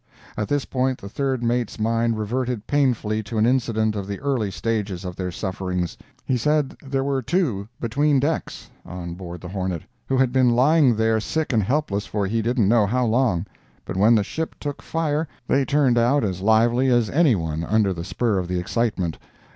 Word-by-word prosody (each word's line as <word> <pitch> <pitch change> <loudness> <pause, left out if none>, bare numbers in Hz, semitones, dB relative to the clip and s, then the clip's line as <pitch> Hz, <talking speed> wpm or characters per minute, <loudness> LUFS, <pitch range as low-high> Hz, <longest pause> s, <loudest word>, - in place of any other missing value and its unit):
At 105 -1 -2
this 145 -1 0
point 130 0 0
the 100 - -9
third 130 +3 -2
mate's 120 -1 -1
mind 115 +1 +1
reverted 120 +1 -2
painfully 120 -7 +1
to 110 +2 -6
an 110 - +4
incident 115 -4 +1
of 100 -2 -4
the 100 -1 -4
early 130 -7 0
stages 95 0 -3
of 90 -1 -5
their 90 -1 -3
sufferings. 90 -2 -3 0.3
He 130 - +1
said 150 +3 +1
there 135 -1 -1
were 135 -1 0
two 125 - 0
between 140 +4 +2
decks, 150 +4 -3
on 85 -1 -7
board 90 -1 -8
the 90 - -7
Hornet, 95 -3 -3 0.2
who 135 - +1
had 130 -2 +2
been 125 -3 +4
lying 135 0 +4
there 110 0 +2
sick 155 +5 -2
and 110 - +3
helpless 105 -3 -1
for 105 -2 -1
he 110 +4 0
didn't 115 -2 +1
know 110 -1 +4
how 125 +4 +1
long; 110 -6 +1 0.4
but - - -5
when 105 +5 +5
the 105 - +3
ship 160 +10 -4
took 145 -1 -5
fire 160 -1 -1 0.2
they 135 0 +2
turned 135 -5 +3
out 125 +4 +3
as 95 -3 -2
lively 115 +5 +3
as 120 -3 +3
any 150 -5 +4
one 80 -2 -3
under 100 +2 +2
the 85 -1 -6
spur 95 +3 0
of 90 - -3
the 90 0 -2
excitement. 95 -3 -1
115 Hz, 195 wpm, -23 LUFS, 100-130 Hz, 0.4 s, when